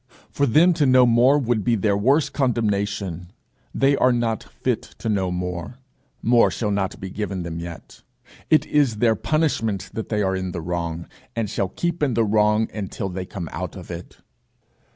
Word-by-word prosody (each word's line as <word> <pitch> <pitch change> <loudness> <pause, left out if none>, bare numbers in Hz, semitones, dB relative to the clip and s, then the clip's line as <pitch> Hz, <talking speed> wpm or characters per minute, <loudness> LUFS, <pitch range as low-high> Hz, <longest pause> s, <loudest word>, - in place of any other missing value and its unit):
For 140 - +1
them 165 +9 +5
to 155 -4 +2
know 130 -1 +6
more 120 +4 +5
would 120 -6 0
be 120 +2 +2
their 100 -1 +1
worse 135 +9 +3
condemnation. 100 - -1 0.4
They 140 +1 +3
are 130 - +3
not 115 -2 0
fit - - -2 0.2
to 115 - -4
know 95 -3 +1
more; 90 +4 -4 0.5
more 120 +1 +5
shall 105 -3 -2
not 100 -1 -2
be 95 -3 -6
given 95 -3 -3
them 85 -1 -5
yet; 85 -1 -9 0.5
it 155 - +4
is 145 -6 +2
their 115 +1 +3
punishment 115 - -1
that 110 - -5
they 105 -2 0
are 95 0 0
in 95 -1 -3
the 85 - -4
wrong, 85 0 -3 0.3
and 115 -2 -1
shall 95 - -1
keep 170 - -3
in 135 -6 +1
the 115 - +3
wrong 105 +1 +3
until 100 -2 -4
they 90 0 -5
come 90 -5 -6
out - - -5
of - - -9
it. 85 0 -8
105 Hz, 185 wpm, -23 LUFS, 95-125 Hz, 0.5 s, know